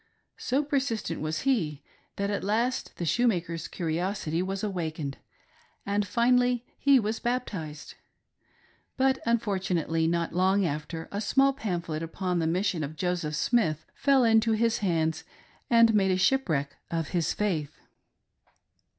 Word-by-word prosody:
So 270 Hz, +4 st, 0 dB
persistent 265 Hz, -, -2 dB
was 155 Hz, 0 st, -2 dB
he 170 Hz, -, 0 dB, 0.3 s
that 200 Hz, +1 st, -1 dB
at 200 Hz, -, -2 dB
last 230 Hz, +6 st, -1 dB
the 175 Hz, -, -3 dB
shoemaker's 170 Hz, -4 st, 0 dB
curiosity 170 Hz, 0 st, -2 dB
was 195 Hz, +2 st, -3 dB
awakened, 160 Hz, -8 st, -3 dB, 0.7 s
and 205 Hz, +1 st, +1 dB
iinally 245 Hz, +3 st, +2 dB, 0.2 s
he 280 Hz, -2 st, +5 dB
was 220 Hz, 0 st, -2 dB
baptized; 190 Hz, -12 st, -4 dB, 1.0 s
but 265 Hz, 0 st, +2 dB
unfortunately, 185 Hz, -8 st, 0 dB
not 170 Hz, 0 st, -1 dB
long 190 Hz, +2 st, +3 dB
after, 160 Hz, +2 st, -4 dB
a 200 Hz, -, -3 dB
small 275 Hz, +5 st, +3 dB
pamphlet 175 Hz, -, -3 dB
upon 180 Hz, +2 st, -2 dB
the 160 Hz, -, 0 dB
mission 175 Hz, -1 st, 0 dB
of 150 Hz, +2 st, -5 dB
Joseph 175 Hz, -3 st, -2 dB
Smith 160 Hz, -4 st, +1 dB
fell 275 Hz, -2 st, +3 dB
into 225 Hz, 0 st, +4 dB
his 230 Hz, +1 st, +1 dB
hands 160 Hz, -5 st, 0 dB, 0.5 s
and 230 Hz, -1 st, +6 dB
made 190 Hz, -3 st, +3 dB
shipwreck 170 Hz, -, +1 dB
of 165 Hz, -2 st, -2 dB
his 170 Hz, -4 st, 0 dB
faith. 170 Hz, -9 st, -2 dB
190 Hz, 130 wpm, -28 LUFS, 165-230 Hz, 1.0 s, and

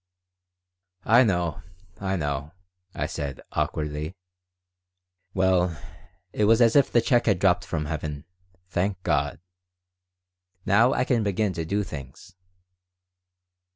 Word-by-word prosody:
"I 120 Hz, +4 st, +6 dB
know, 85 Hz, -7 st, 0 dB, 0.4 s
I 95 Hz, 0 st, -1 dB
know," 75 Hz, -1 st, -3 dB, 0.4 s
I -, -, -1 dB
said, 70 Hz, -3 st, -5 dB
awkwardly. 75 Hz, +3 st, -2 dB, 1.2 s
"Well, 90 Hz, -4 st, +2 dB, 0.5 s
it 105 Hz, -, +1 dB
was 115 Hz, +2 st, +5 dB
as 115 Hz, -2 st, +4 dB
if 140 Hz, -2 st, +4 dB
the 120 Hz, -, +4 dB
check 120 Hz, 0 st, +2 dB
had 100 Hz, -4 st, +4 dB
dropped 90 Hz, 0 st, +2 dB
from 75 Hz, -2 st, -3 dB
heaven. 75 Hz, -2 st, -5 dB, 0.4 s
Thank 95 Hz, +1 st, -2 dB
God! 70 Hz, 0 st, 0 dB, 1.3 s
Now 115 Hz, +6 st, +4 dB
I -, -, +1 dB
can 125 Hz, -2 st, +1 dB
begin 100 Hz, -1 st, 0 dB
to 80 Hz, -1 st, -4 dB
do 100 Hz, +5 st, 0 dB
things." 70 Hz, 0 st, -10 dB
90 Hz, 120 wpm, -25 LUFS, 75-105 Hz, 1.3 s, I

